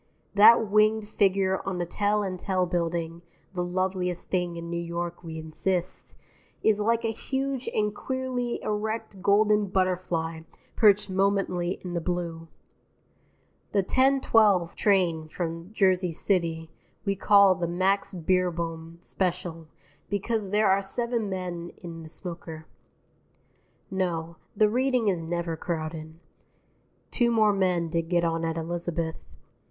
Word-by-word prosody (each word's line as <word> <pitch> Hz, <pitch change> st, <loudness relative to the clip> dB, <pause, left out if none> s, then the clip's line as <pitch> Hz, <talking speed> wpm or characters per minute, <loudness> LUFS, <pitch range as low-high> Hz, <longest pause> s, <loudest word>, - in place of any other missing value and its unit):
That 220 Hz, +2 st, +7 dB
winged 215 Hz, +1 st, +3 dB
figure 195 Hz, -2 st, +1 dB
on 190 Hz, -2 st, -3 dB
the 175 Hz, -, -1 dB
Tel 205 Hz, +4 st, 0 dB
and 185 Hz, -2 st, -4 dB
Tel 185 Hz, -1 st, 0 dB
Building 170 Hz, -1 st, -2 dB, 0.3 s
(the 180 Hz, -1 st, -1 dB
loveliest 180 Hz, 0 st, -2 dB
thing 180 Hz, -2 st, 0 dB
in 170 Hz, 0 st, -6 dB
New 170 Hz, 0 st, -3 dB
York, 170 Hz, +1 st, -4 dB
we 160 Hz, -1 st, -7 dB
insist) 175 Hz, +3 st, -3 dB, 0.5 s
is 215 Hz, -1 st, +3 dB
like 230 Hz, +2 st, +1 dB
a 225 Hz, -, +1 dB
huge 265 Hz, +3 st, -3 dB
and 210 Hz, -1 st, 0 dB
queerly 255 Hz, 0 st, -3 dB
erect 215 Hz, -1 st, -3 dB
golden 210 Hz, +1 st, +3 dB
butterfly 180 Hz, -3 st, -1 dB, 0.4 s
perched 205 Hz, -2 st, +4 dB
momently 190 Hz, -2 st, 0 dB
in 180 Hz, -1 st, -5 dB
the 170 Hz, -, -1 dB
blue. 170 Hz, -1 st, -3 dB, 1.3 s
The 200 Hz, -2 st, +3 dB
10:12 225 Hz, -7 st, +3 dB
train 175 Hz, -6 st, +1 dB
from 165 Hz, +1 st, -5 dB
Jersey 185 Hz, -4 st, +2 dB
City 165 Hz, -2 st, -1 dB, 0.3 s
we 200 Hz, -1 st, +1 dB
call 200 Hz, -1 st, +6 dB
the 175 Hz, -2 st, -2 dB
Max 190 Hz, +3 st, 0 dB
Beerbohm 170 Hz, -2 st, -1 dB
Special 175 Hz, -3 st, -3 dB, 0.4 s
because 205 Hz, +1 st, -1 dB
there 210 Hz, 0 st, +3 dB
are 195 Hz, +1 st, +3 dB
Seven 235 Hz, +2 st, -2 dB
Men 175 Hz, -2 st, -5 dB
in 165 Hz, -2 st, -8 dB
the 160 Hz, -, -10 dB
smoker. 165 Hz, -2 st, -8 dB, 1.3 s
No, 170 Hz, -3 st, -2 dB, 0.2 s
the 215 Hz, -, +5 dB
Reading 250 Hz, 0 st, +1 dB
is 180 Hz, -4 st, -1 dB
never 170 Hz, 0 st, -2 dB
crowded. 160 Hz, -1 st, -5 dB, 1.0 s
(Two 240 Hz, -2 st, +2 dB
more 215 Hz, -3 st, +4 dB
men 180 Hz, -3 st, +1 dB
did 165 Hz, 0 st, -2 dB
get 175 Hz, -1 st, +2 dB
on 165 Hz, 0 st, -1 dB
at 165 Hz, 0 st, -1 dB
Elizabeth.) 165 Hz, 0 st, -3 dB
185 Hz, 130 wpm, -27 LUFS, 170-205 Hz, 1.3 s, That